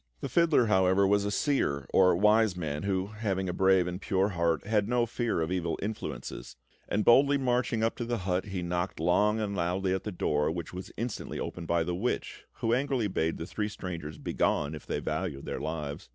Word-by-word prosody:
The - - -3
fiddler, 165 -7 +4
however, 95 -1 +3
was 100 +1 +3
a - - 0
seer, 100 - 0
or 90 -2 +5
wise 105 0 +4
man, 75 -4 -3
who, 95 -2 0
having 95 -3 -1
a 90 - -2
brave 95 -1 +4
and 90 +2 -5
pure 95 +1 +1
heart, 85 -3 0
had 105 0 +1
no 120 -1 +2
fear 120 -5 -1
of 80 +2 -2
evil 85 -3 -1
influences; 85 - -5 0.3
and 105 +1 0
boldly 140 +4 +6
marching 125 -3 0
up 115 - +1
to 120 - -3
the 120 0 -1
hut, 90 -2 -1
he 95 -3 -4
knocked 90 0 -2
long 105 +6 +2
and 100 -2 -2
loudly 90 +2 0
at 95 0 -2
the 105 - -4
door, 75 -4 0
which 85 +1 -5
was 90 +1 -7
instantly 115 0 -4
opened 85 -2 -5
by 85 0 +2
the 90 +2 -2
witch, 105 +8 -3
who 115 - -1
angrily 130 -3 +1
bade 80 -2 -1
the 80 - -5
three 105 +3 -3
strangers 85 -7 -6
begone 75 0 0
if 75 - -9
they - - -1
valued 70 0 -3
their - - -4
lives. 75 -2 -5
95 Hz, 210 wpm, -29 LUFS, 85-110 Hz, 0.3 s, boldly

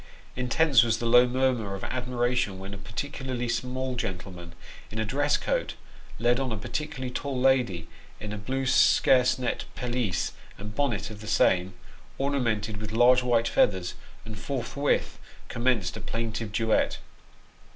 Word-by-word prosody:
Intense 130 +1 +4
was 115 -1 +1
the 120 - -4
low 120 +1 +6
murmur 125 -5 0
of 95 - -8
admiration 125 -4 -1
when 95 +1 -8
a - - -6
particularly 125 +3 -4
small 130 +2 -2
gentleman, 90 -5 -6 0.4
in 110 - -8
a 110 - 0
dress 145 +6 +1
coat, - - -2 0.4
led 120 +3 +2
on 130 -2 -2
a 110 - -2
par 110 +4 -8
ticularly 135 -3 -4
tall 135 -1 -3
lady 125 -11 +2 0.3
in 105 -1 -5
a - - -4
blue 130 +5 -2
sarcenet 130 -1 +3
pelisse 120 -6 -1 0.3
and 105 +1 -8
bonnet 120 -6 -1
of 105 -1 -10
the 105 - -9
same, 95 -2 +2 0.4
ornamented 115 -7 -1
with 105 0 -6
large 120 +3 +5
white 120 -2 +2
feathers, 95 -3 +2 0.3
and 110 -3 -8
forthwith 140 +4 -1 0.3
commenced 115 -6 0
a - - -7
plaintive 115 -2 -3
duet. 110 +1 +1
120 Hz, 150 wpm, -27 LUFS, 105-130 Hz, 0.4 s, low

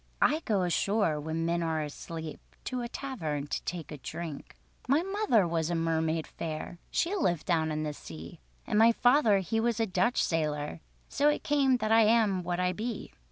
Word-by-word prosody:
I 305 - +3
go 200 -4 +1
ashore 180 -2 +1
when 160 +2 -2
men 170 +1 0
are 160 -2 0
asleep 160 +1 -7 0.2
To 255 -1 -3
a 240 - -3
tavern 160 - -4
to - - -3
take 170 -3 -5
a 150 - -7
drink. 160 +1 -7 0.3
"My 285 +6 +3
mother 390 - +2
was 165 -1 -1
a 175 - 0
mermaid 160 -1 0
fair, 160 +2 -6
She 345 +4 0
lived 175 - 0
down 160 -3 +1
in 155 0 -2
the 150 -1 -3
sea; 80 - -10 0.3
And 210 - +1
my 230 +1 +7
father 245 -5 +4
he 225 +5 -1
was 230 0 0
a 225 - +3
Dutch 235 +5 +1
sailór, 150 - -1 0.3
So 290 +1 +2
it 295 - -1
came 275 -3 +3
that 220 -2 -1
I 225 0 +7
am 215 -4 +3
what 175 0 -2
I 180 0 +1
be. 225 +3 -5
175 Hz, 195 wpm, -30 LUFS, 160-230 Hz, 0.3 s, my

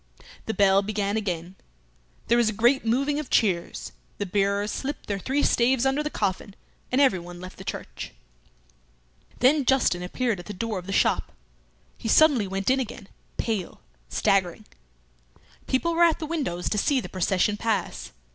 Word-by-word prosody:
The 220 - -2
bell 195 0 +5
began 205 0 -2
again. 180 -5 -3 0.7
There 235 - +3
was 235 -2 +3
a - - -3
great 240 +6 +3
moving 275 +6 +1
of 300 - -6
chairs; 185 -6 0 0.3
the 205 - -2
bearers 200 +2 0
slipped 285 +2 -4
their 200 -1 -3
three 270 +8 0
staves 250 +1 +3
under 270 +2 +2
the 300 - -2
coffin, 200 -4 -2 0.4
and 255 - +2
everyone 175 -10 +1
left 185 +1 -10
the - - -7
church. - - -6 1.3
Then 280 +4 +5
Justin 250 -9 +2
appeared 220 +3 -1
at 175 - -10
the 210 - -5
door 210 +1 -3
of 180 - -12
the - - -4
shop. - - +1 0.7
He 230 - -5
suddenly 265 -4 +5
went 195 +5 0
in 265 - +2
again, 215 -5 -6 0.3
pale, 215 -6 -3 0.3
staggering. 185 -4 +1 1.0
People 335 +6 +1
were 335 - 0
at 335 -2 +5
the 320 - -5
windows 280 - -3
to 210 - 0
see 275 +5 +2
the - - -6
procession 190 +2 +1
pass. 220 0 -2
215 Hz, 165 wpm, -25 LUFS, 195-265 Hz, 1.3 s, bell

